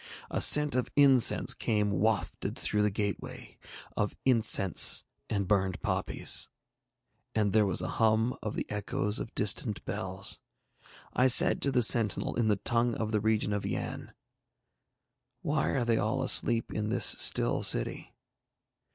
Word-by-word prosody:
A -, -, -2 dB
scent 150 Hz, -1 st, +6 dB
of 125 Hz, -1 st, -1 dB
incense 135 Hz, -4 st, +3 dB
came 105 Hz, -2 st, -2 dB
wafted 100 Hz, -3 st, -3 dB
through 105 Hz, -, -2 dB
the 105 Hz, -, +1 dB
gateway, 100 Hz, -1 st, -6 dB, 0.4 s
of 105 Hz, -, -3 dB
incense 110 Hz, -, +3 dB, 0.2 s
and 100 Hz, -3 st, -3 dB
burned 95 Hz, -3 st, -1 dB
poppies, -, -, 0 dB, 0.9 s
and 105 Hz, -3 st, -1 dB
there 110 Hz, -2 st, +2 dB
was 90 Hz, -1 st, +1 dB
a -, -, -4 dB
hum 110 Hz, +2 st, +1 dB
of 110 Hz, -, -6 dB
the -, -, -4 dB
echoes 105 Hz, +1 st, -3 dB
of -, -, -9 dB
distant 105 Hz, +1 st, -2 dB
bells. -, -, -4 dB, 0.7 s
I 125 Hz, -, +2 dB
said 125 Hz, -, +5 dB
to 140 Hz, -, 0 dB
the 125 Hz, -2 st, +2 dB
sentinel 110 Hz, -2 st, +2 dB
in 120 Hz, -2 st, -1 dB
the 105 Hz, -, +1 dB
tongue 120 Hz, +3 st, 0 dB
of 110 Hz, -1 st, -5 dB
the 105 Hz, -2 st, -1 dB
region 110 Hz, -1 st, -1 dB
of 105 Hz, -, -4 dB
Yann, -, -, -6 dB, 1.3 s
'Why 150 Hz, +1 st, -2 dB
are 125 Hz, -3 st, -2 dB
they 115 Hz, -1 st, 0 dB
all 130 Hz, +5 st, -2 dB
asleep 120 Hz, -3 st, +1 dB
in 105 Hz, 0 st, -4 dB
this -, -, 0 dB
still -, -, +2 dB
city?' -, -, 0 dB
110 Hz, 150 wpm, -28 LUFS, 105-120 Hz, 1.3 s, scent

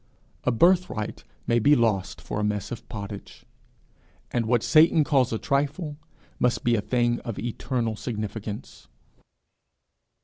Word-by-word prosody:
A 125 Hz, -, +3 dB
birthright 170 Hz, -, +2 dB, 0.2 s
may 120 Hz, -, +3 dB
be 145 Hz, +6 st, +5 dB
lost 110 Hz, -6 st, 0 dB
for 105 Hz, -, -4 dB
a -, -, -1 dB
mess 105 Hz, -2 st, -2 dB
of 120 Hz, -, -7 dB
pottage, 100 Hz, -2 st, -8 dB, 0.9 s
and 120 Hz, -2 st, 0 dB
what 120 Hz, -1 st, +2 dB
Satan 160 Hz, 0 st, +5 dB
calls 135 Hz, -4 st, +2 dB
a 110 Hz, -, 0 dB
trifle 145 Hz, +5 st, -1 dB, 0.4 s
must 125 Hz, 0 st, +1 dB
be 120 Hz, -, +3 dB
a 110 Hz, -, +2 dB
thing 120 Hz, +1 st, +1 dB
of 115 Hz, -4 st, -6 dB
eternal 120 Hz, -1 st, -2 dB
significance. 105 Hz, -2 st, -6 dB
120 Hz, 135 wpm, -26 LUFS, 110-140 Hz, 0.9 s, be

